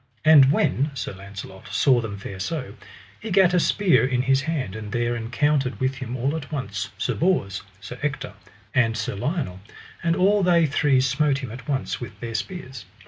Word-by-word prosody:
And 145 -4 +8
when 145 -1 +1
Sir 120 - -4
Launcelot 95 0 -10
saw 130 -4 +3
them 105 -3 -5
fare 100 -1 -8
so, 125 - -4 0.5
he 220 - -6
gat 190 -2 +4
a 180 - +4
spear 190 +1 +3
in 125 -1 +1
his 135 0 +3
hand; 135 - -3
and 105 -1 -7
there 120 +1 0
encountered 130 +3 0
with 130 +1 +1
him 130 -1 -5
all 135 +5 0
at 155 -3 -6
once 140 -4 -3
Sir - - -1
Bors, 150 - 0 0.2
Sir 110 +6 -9
Ector, 145 -7 -3 0.4
and 115 -3 +2
Sir 110 - -2
Lionel, 125 - -2 0.4
and 165 0 +1
all 200 +3 +3
they 175 -3 +4
three 140 -2 +3
smote 135 +2 +2
him 120 - -5
at 125 +3 -9
once 135 -2 -2
with 120 - -8
their 115 -1 -5
spears. 130 - -5
130 Hz, 190 wpm, -24 LUFS, 115-155 Hz, 0.5 s, And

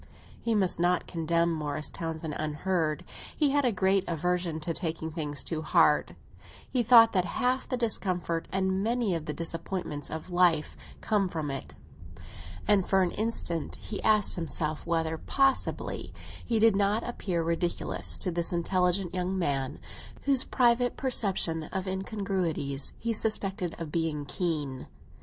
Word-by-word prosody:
He 230 -1 0
must 190 -5 +1
not 175 0 +2
condemn 170 0 +1
Morris 150 -1 -3
Townsend 160 -1 -4
unheard. 155 +1 -1 0.3
He 295 -3 +3
had 285 -1 +2
a 245 - +3
great 190 -1 +2
aversion 175 0 -1
to 165 +2 -2
taking 160 -2 -3
things 150 -3 -4
too 160 -2 -3
hard; 155 -2 +3 0.5
he 255 - +1
thought 230 -1 +7
that 185 -3 +2
half 255 +1 0
the 255 - 0
discomfort 180 -7 -1
and 190 0 0
many 230 -3 +1
of 165 -1 -3
the - - -1
disappointments 165 -2 -4
of 160 +3 -6
life 175 -3 +3 0.3
come 205 -4 +1
from 155 -4 -3
it; 135 - -6 0.9
and 195 -3 +3
for 190 -1 +4
an 180 - 0
instant 210 -7 -2
he 210 - -5
asked 215 -3 +3
himself 155 -2 -2
whether, 160 -1 0
possibly, 270 -1 0 0.3
he 230 - 0
did 220 -1 +5
not 205 +3 +1
appear 185 -8 -2
ridiculous 170 +1 0
to 180 - -1
this 170 0 +1
intelligent 180 +1 +1
young 185 +1 -1
man, 140 -6 -1 0.5
whose 270 -2 +3
private 245 0 +2
perception 190 - +1
of 190 +4 -4
incongruities 185 - -1
he 230 0 -1
suspected 195 -5 0
of 165 -3 -6
being 160 -3 -1
keen. 145 -6 -2
180 Hz, 145 wpm, -29 LUFS, 160-200 Hz, 0.9 s, thought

